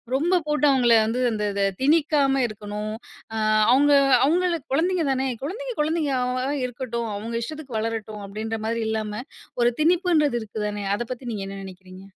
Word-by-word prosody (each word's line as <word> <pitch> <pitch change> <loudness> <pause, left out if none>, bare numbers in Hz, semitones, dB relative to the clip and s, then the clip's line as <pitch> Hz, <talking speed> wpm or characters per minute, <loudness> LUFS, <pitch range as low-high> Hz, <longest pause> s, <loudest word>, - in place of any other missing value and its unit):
ரொம்ப 340 +7 +2
போட்டு 300 0 +1
அவங்கள 245 -3 +4
வந்து 235 +3 -1
இந்த 210 -1 -2
இத 200 0 0 0.2
திணிக்காம 285 -2 +3
இருக்கணும். 210 0 -6 0.4
அ 220 - -3 0.4
அவங்க 290 +2 +5 0.3
அவங்களு 345 +3 +2 0.2
குழந்தைங்க 340 +2 +1
தானே. 265 0 0 0.2
குழந்தைங்க 475 - -4
குழந்தைங்க 310 -1 0
அவங்களா 255 +2 -1
இருக்கட்டும். 235 -2 -4
அவங்க 230 +3 -5
இஷ்டத்துக்கு 285 -3 -6
வளரட்டும் 215 -2 -4
அப்படின்ற 220 +3 -4
மாதிரி 230 +1 -1
இல்லாம 215 +1 -3 0.4
1 240 - +4
திணிப்புன்றது 325 -5 +3
இருக்கு 215 0 -5
தானே. 205 0 -4
அத 240 - -3
பத்தி 250 0 -6
நீங்க 200 -3 -4
என்ன 195 0 -7
நினைக்கிறீங்க? 185 0 -12
250 Hz, 155 wpm, -24 LUFS, 215-300 Hz, 0.4 s, அவங்க